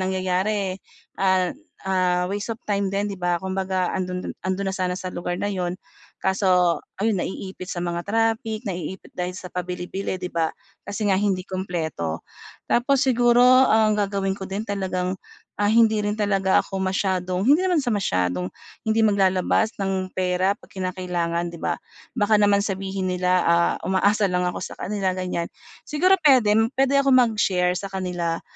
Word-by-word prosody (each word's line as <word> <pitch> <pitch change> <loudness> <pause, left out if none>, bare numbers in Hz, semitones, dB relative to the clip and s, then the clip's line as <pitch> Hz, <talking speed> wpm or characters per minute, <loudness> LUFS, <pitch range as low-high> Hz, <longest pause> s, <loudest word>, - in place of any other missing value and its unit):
nangyayari, 190 +1 -1 0.4
an 185 -2 +2 0.3
ah, 180 -1 +2
waste 205 +4 -3
of - - -39
time 200 -1 0
din, 200 +1 -1
'di 195 - -9
ba? 175 0 +1
Kumbaga 190 0 -1
'ando'n 180 -1 -3
do'n - - -4
'ando'n 190 +1 -2
na - - -4
sana 180 -1 -1
sa 185 -1 -6
lugar 175 0 -3
na - - -1
'yon. 180 -2 -2 0.4
Kaso 180 -4 +2 0.2
ayun 215 +2 +1
naiipit 190 -1 -6
sa - - -4
mga 175 0 -2
traffic, 225 +1 0
naiipit 180 -1 -5
dahil 180 0 -3
sa - - -8
pabili-bili, 180 +2 -3
'di 180 -1 -6
ba? 165 -1 +1 0.3
Kasi 205 +1 -3
nga - - +4
hindi 195 -3 0
kumpleto. 160 - -3 0.4
Tapos 265 +3 +2
siguro, 245 -1 +4 0.3
ang 215 -1 +4
gagawin 195 -2 0
ko 190 -1 -7
din 205 +3 -3
talagang, 185 -2 -2 0.4
ah, 205 0 +2
hindi 220 -1 +4
rin 205 0 -1
talaga 195 -2 +2
ako 195 - -5
masyadong 185 -1 0
hindi 290 +4 +6
naman 350 -5 +2
sa 245 - -1
masyadong 90 - 0 0.4
hindi 220 +1 +2
maglalabas 200 +1 +2
ng 190 -1 -2
pera 185 +1 +1
'pag - - -19
kinakailangan, 180 -2 -2
'di - - -8
ba? - - -1 0.4
Baka 210 0 +3
naman 205 -1 +4
sabihin 190 -1 -2
nila, 180 0 +2
ah, 170 0 +3
umaasa 200 +2 +3
lang 180 -1 0
ako 180 - -2
sa - - -6
kanila, 195 -2 -1
ganyan. 180 -2 -2 0.4
Siguro 365 +6 +3
puwede 255 -8 +5 0.2
puwede 270 +1 +2
ako 275 0 +3
mag-share 210 -7 +3
sa 200 - -5
kanila. 175 -3 -2
190 Hz, 165 wpm, -23 LUFS, 180-205 Hz, 0.4 s, hindi